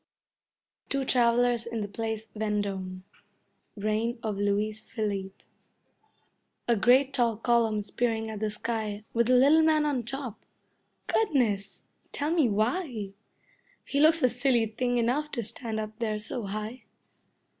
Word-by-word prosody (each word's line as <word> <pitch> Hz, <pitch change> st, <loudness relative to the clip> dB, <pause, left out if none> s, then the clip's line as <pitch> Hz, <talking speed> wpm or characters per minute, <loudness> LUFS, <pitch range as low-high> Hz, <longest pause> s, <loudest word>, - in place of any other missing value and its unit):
Two 275 Hz, -1 st, 0 dB
Travellers 240 Hz, -1 st, +2 dB
in 230 Hz, -2 st, -3 dB
the 205 Hz, -, -3 dB
Place 220 Hz, +1 st, -4 dB
Vendome 200 Hz, -3 st, -2 dB, 0.7 s
Reign 215 Hz, +4 st, -1 dB
of 215 Hz, -2 st, -1 dB
Louis 205 Hz, +1 st, +1 dB
Philippe 200 Hz, -4 st, -4 dB, 1.2 s
A 235 Hz, -, +4 dB
great 255 Hz, +6 st, +4 dB
tall 235 Hz, -4 st, +2 dB
column 225 Hz, -2 st, +2 dB
spearing 225 Hz, +2 st, -1 dB
at 215 Hz, -, -6 dB
the 215 Hz, 0 st, -1 dB
sky 215 Hz, -1 st, -3 dB
With 235 Hz, +1 st, +2 dB
a 255 Hz, -, +6 dB
little 285 Hz, +6 st, +6 dB
man 310 Hz, -1 st, +3 dB
on 285 Hz, -4 st, 0 dB
top. 245 Hz, -1 st, -6 dB, 0.6 s
Goodness! 225 Hz, -, 0 dB, 0.3 s
Tell 295 Hz, +2 st, -2 dB
me 320 Hz, -8 st, +3 dB
why? 220 Hz, -, -1 dB, 0.7 s
He 280 Hz, -, -1 dB
looks 315 Hz, +2 st, +5 dB
a 255 Hz, -, +6 dB
silly 245 Hz, -2 st, +2 dB
thing 245 Hz, +3 st, -1 dB
enough 255 Hz, +6 st, +1 dB
to 235 Hz, -, -1 dB
stand 220 Hz, +1 st, -3 dB
up 215 Hz, 0 st, -6 dB
there 215 Hz, -2 st, -1 dB
so 215 Hz, +1 st, -4 dB
high. 215 Hz, +4 st, -5 dB
230 Hz, 135 wpm, -28 LUFS, 210-250 Hz, 1.2 s, a